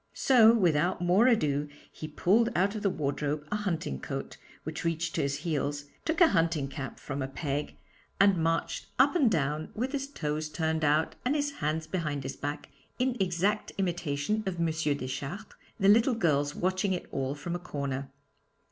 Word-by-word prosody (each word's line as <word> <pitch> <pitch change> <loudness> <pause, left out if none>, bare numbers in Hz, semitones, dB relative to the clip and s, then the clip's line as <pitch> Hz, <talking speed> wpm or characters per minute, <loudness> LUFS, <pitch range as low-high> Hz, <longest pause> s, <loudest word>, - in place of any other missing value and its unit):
So 235 -4 +6
without 180 -5 +2
more 185 +7 +4
ado 150 - +2 0.2
he 155 - -7
pulled 200 +9 +3
out 195 +3 +2
of 215 - -4
the 200 - +2
wardrobe 150 -1 -2
a - - +1
hunting 170 - -2
coat, - - -5 0.3
which 155 +1 -5
reached 165 0 -1
to - - 0
his 140 0 0
heels, 145 -2 -1 0.2
took 320 0 0
a 340 -3 +7
hunting 165 - +1
cap 135 -2 -6
from 140 0 -5
a 135 - -1
peg, 145 +1 -3 0.4
and 200 -1 +6
marched 165 0 -1
up 275 +4 +4
and 285 -9 +4
down 155 -3 -1
with 250 +4 -2
his 275 -1 -2
toes 155 - -3
turned 160 0 -1
out 150 +2 +2
and 255 +4 +1
his 290 -1 0
hands 155 - -2
behind 155 -5 -2
his 135 0 -5
back, 145 +1 -5 0.3
in 255 0 +1
exact 190 +3 0
imitation 175 +1 -1
of 190 - -1
M. 170 - +2 0.3
Deschartres, 135 +10 -5 0.3
the 195 - +3
little 230 +5 +5
girls 145 -8 +1
watching 185 +2 0
it 180 - -4
all 135 +1 -2
from 160 +4 -5
a 175 - -2
corner. 140 -5 -4
165 Hz, 180 wpm, -29 LUFS, 145-205 Hz, 0.4 s, a